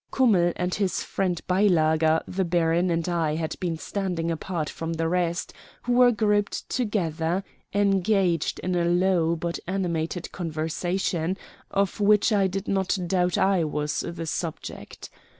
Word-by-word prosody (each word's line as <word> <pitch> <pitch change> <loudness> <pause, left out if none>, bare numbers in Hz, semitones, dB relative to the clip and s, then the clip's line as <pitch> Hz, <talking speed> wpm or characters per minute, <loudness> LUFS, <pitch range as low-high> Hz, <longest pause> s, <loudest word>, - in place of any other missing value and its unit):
Kummell 195 -10 +3
and 180 0 -2
his 195 -4 0
friend 180 -3 -1
Beilager, 160 -4 +3
the 190 +1 -1
baron, 170 0 +2
and 165 0 0
I 165 -3 0
had 160 -1 -3
been 170 -3 -2
standing 175 -2 -2
apart 165 -1 -3
from 165 +2 -4
the 165 0 -1
rest, 170 0 -1 0.3
who 245 - 0
were 245 0 +6
grouped 210 -2 0
together, 180 -6 -1 0.3
engaged 195 -4 +2
in 185 - -1
a 175 -1 +1
low 175 -1 +2
but 170 +1 -3
animated 175 -2 -2
conversation, 170 +2 -2 0.3
of 200 0 0
which 210 +2 +4
I 200 -2 +3
did 195 +2 -4
not 195 -1 +1
doubt 180 0 +1
I 190 -3 +3
was 150 -1 -2
the 170 -1 -4
subject. 160 0 -6
175 Hz, 145 wpm, -25 LUFS, 165-195 Hz, 0.3 s, were